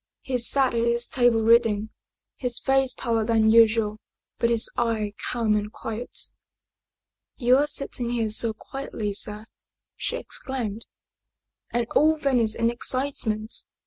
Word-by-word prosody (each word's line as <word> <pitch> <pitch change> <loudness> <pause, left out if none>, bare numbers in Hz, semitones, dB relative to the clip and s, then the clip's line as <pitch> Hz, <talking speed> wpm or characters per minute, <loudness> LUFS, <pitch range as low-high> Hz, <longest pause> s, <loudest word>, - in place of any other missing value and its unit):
He 255 -2 -2
sat 260 +2 +3
at 230 - 0
his 235 0 +1
table 240 -3 +2
reading, 220 -2 +3 0.4
his 245 -2 -2
face 270 -1 +1
paler 230 -3 -1
than 220 -1 +3
usual, 225 -2 +4 0.4
but 235 - +2
his 230 -1 +2
eye 220 -3 -1 0.2
calm 225 -3 +1
and 210 0 -2
quiet. 225 +2 -6 0.5
" - - -46 0.3
You 250 0 +4
are 290 +2 +2
sitting 255 -4 -2
here 230 -3 -1
so 225 +1 +6
quietly, 220 -4 -6
sir!" 210 +2 -1 0.5
she - - -3
exclaimed. 230 - -4 0.8
"And 240 0 -1
all 315 +1 +4
Venice 245 -7 +1
in 230 0 +1
excitement? 240 -4 -2
235 Hz, 140 wpm, -24 LUFS, 220-250 Hz, 0.8 s, so